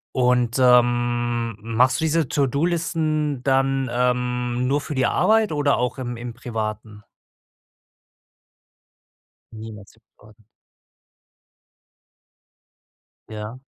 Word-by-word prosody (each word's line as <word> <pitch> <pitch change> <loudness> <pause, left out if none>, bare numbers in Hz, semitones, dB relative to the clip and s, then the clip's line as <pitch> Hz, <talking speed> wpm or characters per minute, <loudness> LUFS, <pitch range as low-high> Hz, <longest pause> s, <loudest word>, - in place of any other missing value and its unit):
Und, 125 -1 +2
ähm, 120 -2 +2
machst 115 +7 +1
du 160 - 0
diese 160 -1 +1
To-do-Listen 155 0 0
dann, 135 0 +1
ähm, 125 0 -1
nur 140 +3 +1
für 150 - -6
die 130 -3 +1
Arbeit 220 -2 +2
oder 145 -2 +1
auch 125 +2 -2
im 120 -2 -5
im 120 0 -7
Privaten? 110 -3 -6 2.5
Niemals 110 -2 -10
im 110 - -29 0.2
Privaten. 110 -1 -20 2.8
Ja. 110 +4 -8
125 Hz, 90 wpm, -22 LUFS, 115-135 Hz, 2.8 s, Und